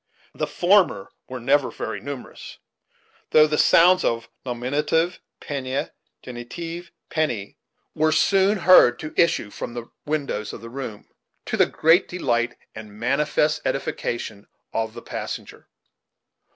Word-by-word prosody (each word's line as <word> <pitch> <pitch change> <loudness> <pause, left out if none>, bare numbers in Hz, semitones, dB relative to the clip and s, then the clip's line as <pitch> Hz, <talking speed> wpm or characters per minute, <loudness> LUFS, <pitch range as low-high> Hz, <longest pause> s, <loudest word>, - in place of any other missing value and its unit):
The - - -2
former 175 - +2 0.2
were 130 0 -5
never 135 +3 +2
very 110 -2 -5
numerous; 140 +4 -8 0.7
though 155 - +7
the 150 0 0
sounds 180 +2 +6
of 115 0 -1
"nominative, 150 +8 0 0.2
pennaa 135 -1 -3 0.3
genitive, 165 +8 -7 0.2
penny," 120 -11 -2 0.3
were 155 +1 +2
soon 195 +4 +3
heard 175 -10 +6
to 155 +3 -7
issue 145 -10 +2
from 120 - -6
the 120 -1 -7 0.2
windows 140 -8 -2
of - - -8
the 115 0 -10
room, 125 -5 -7 0.4
to - - -2
the - - +4
great 165 +4 +3
delight 120 -9 -1 0.2
and 105 -1 -10
manifest 150 +5 +1
edification 120 -6 -3 0.3
of 110 -1 -2
the - - -9
passenger. - - -7
135 Hz, 125 wpm, -23 LUFS, 120-160 Hz, 0.7 s, though